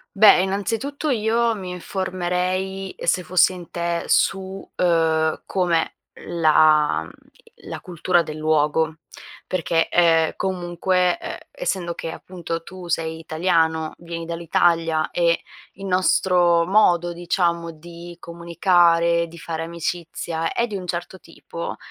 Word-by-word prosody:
Beh, 200 -2 +7
innanzitutto 225 +10 -2
io 230 -1 +1
mi 185 -3 -6
informerei, 185 +1 -3
se 180 +1 +1
fossi 185 +2 +3
in 175 -2 -11
te 170 0 -2
su, 195 - +2 0.4
uhm, 160 -2 +1
com'è 175 -3 0 0.4
la 155 - +4
mhmm, - - -11 0.6
la - - -5
cultura 175 0 +1
del 155 -2 -6
luogo, 155 +1 +1 0.5
perché, 165 -2 0
ehm, 165 -2 +3
comunque, 180 0 0
uhm, - - -6
essendo 185 - -3
che 165 - -5
appunto 170 -2 -6
tu 180 +1 -10
sei 160 -1 -1
italiano, 160 -1 0
vieni 170 -1 -7
dall'Italia 165 -1 +1
e 170 -1 +1 0.3
il 195 +1 -9
nostro 180 -2 +3
modo 175 -4 +3
diciamo 170 -1 -1
di 170 +2 -11
comunicare, 170 0 +2
di 170 +1 -13
fare 165 -1 -4
amicizia 165 0 -4
è 235 - 0
di 210 - -6
un 185 -2 -5
certo 175 +2 -5
tipo, 170 0 -8
170 Hz, 125 wpm, -22 LUFS, 165-185 Hz, 0.6 s, Beh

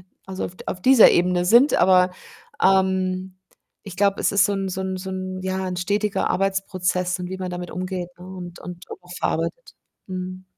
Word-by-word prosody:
äh - - -20 0.2
also, 190 0 -4
auf 180 - -7
d - - -12
auf 180 - -4
dieser 255 +1 +7
Ebene 180 0 +2
sind, 240 +10 +5
aber, 185 0 +5 0.5
ähm, 190 -1 +1 0.5
ich 200 - -9
glaube, 200 0 +2
es - - +1
ist 200 -2 +5
so 205 - -1
'n 195 -1 -2
so 185 - -4
'n 190 0 -3
so 190 +1 -6
'n 185 0 -5
ja, 190 0 -2
'n 180 - -4
stetiger 205 +3 0
Arbeitsprozess 185 -1 -1
und 180 - -4
wie 190 - -5
man 185 -1 -5
damit 180 -1 -6
umgeht, 185 -1 -4
ne, 180 - -11
und 180 -2 -9
und 180 +1 -9
auch 430 - -10
verarbeitet. - - -3 0.3
Mhm. 185 0 -6
185 Hz, 200 wpm, -23 LUFS, 180-190 Hz, 0.5 s, dieser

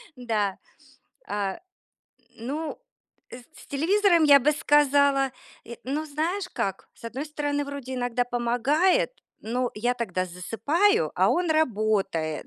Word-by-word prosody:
Да. 220 -6 -1 0.7
А, 200 -2 -3 0.8
ну, 290 +7 -5 0.5
с - - -8 0.3
с - - -22
телевизором, 345 +3 +3
я 285 -2 +8
бы 295 +4 +3
сказала 280 -2 +3 0.3
э, 235 - -9
ну, 290 +4 -2
знаешь, 340 +6 -2
как? 195 - -3
С - - -19
одной 255 +6 -5
стороны, 290 -1 -2
вроде 280 -2 -6
иногда 245 -1 -1
помогает, 275 - +1 0.3
но 245 +3 -2
я 240 +4 0
тогда 185 -7 -2
засыпаю, 285 - +1
а - - +3
он 350 -1 +1
работает. 210 - 0
270 Hz, 125 wpm, -26 LUFS, 230-305 Hz, 0.8 s, я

